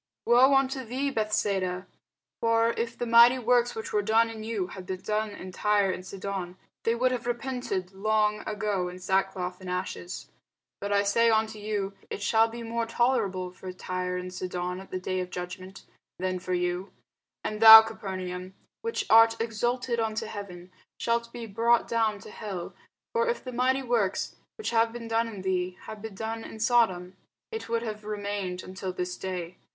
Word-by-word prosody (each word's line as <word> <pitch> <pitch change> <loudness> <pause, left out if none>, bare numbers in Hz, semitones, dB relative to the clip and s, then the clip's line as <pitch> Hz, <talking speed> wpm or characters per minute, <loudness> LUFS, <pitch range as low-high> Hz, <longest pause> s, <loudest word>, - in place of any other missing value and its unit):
woe 255 +3 +6
unto 270 0 +1
thee, 260 +4 -2
Bethsaida! 200 -5 0 0.5
for 230 0 +3
if 230 +1 -3
the 240 - -2
mighty 235 +2 +7
works, 245 0 +2
which 220 - -6
were 210 - +3
done 225 +2 +3
in 220 -1 -7
you, 220 -4 -2
had 185 +1 -9
been 185 -1 -3
done 215 0 -1
in 190 -2 -8
Tyre 205 0 +2
and 185 - -5
Sidon, 190 -1 -5 0.2
they 230 - +1
would 255 +2 +2
have 245 -2 -3
repented 240 -6 -3
long 210 +1 +1
ago 205 -3 -1
in 180 - -9
sackcloth 190 0 -1
and 185 - -7
ashes. 180 0 -5 0.5
But 200 0 -4
I 200 0 +3
say 230 +3 +3
unto 220 -1 +1
you, 205 -2 -2 0.2
It 200 - -5
shall 225 +2 +4
be 230 +1 -7
more 230 0 -2
tolerable 200 -7 +1
for 185 0 -8
Tyre 180 0 -3
and 180 0 -6
Sidon 180 0 -3
at 190 - -11
the 185 - -3
day 185 0 -2
of 180 0 -3
judgment, 185 +2 -7 0.3
than 185 0 -2
for 185 0 -2
you. 180 +2 -2 0.5
And 215 0 -3
thou, 220 0 +13
Capernaum, 185 -4 -6 0.3
which 460 0 -2
art 225 0 +6
exalted 240 +2 -1
unto 220 0 -1
heaven, 185 -4 -8 0.3
shalt 235 0 0
be 235 -1 -6
brought 230 +3 +2
down 225 -2 +1
to 210 - -11
hell: 190 -5 -6 0.4
for 465 0 +2
if 475 - -2
the 255 - -6
mighty 260 +2 +1
works, 230 -6 0 0.2
which 435 - -3
have 230 0 +3
been 235 0 -7
done 225 +1 +1
in 205 -4 -7
thee, 185 -1 -1
had 215 -1 -9
been 220 -2 -7
done 225 +2 -4
in 220 - -9
Sodom, 195 -6 +2 0.3
it 445 - -5
would 230 0 0
have 215 -2 -5
remained 205 -3 -3
until 185 0 -5
this 180 0 -3
day. 180 -2 -5
210 Hz, 180 wpm, -28 LUFS, 185-230 Hz, 0.5 s, thou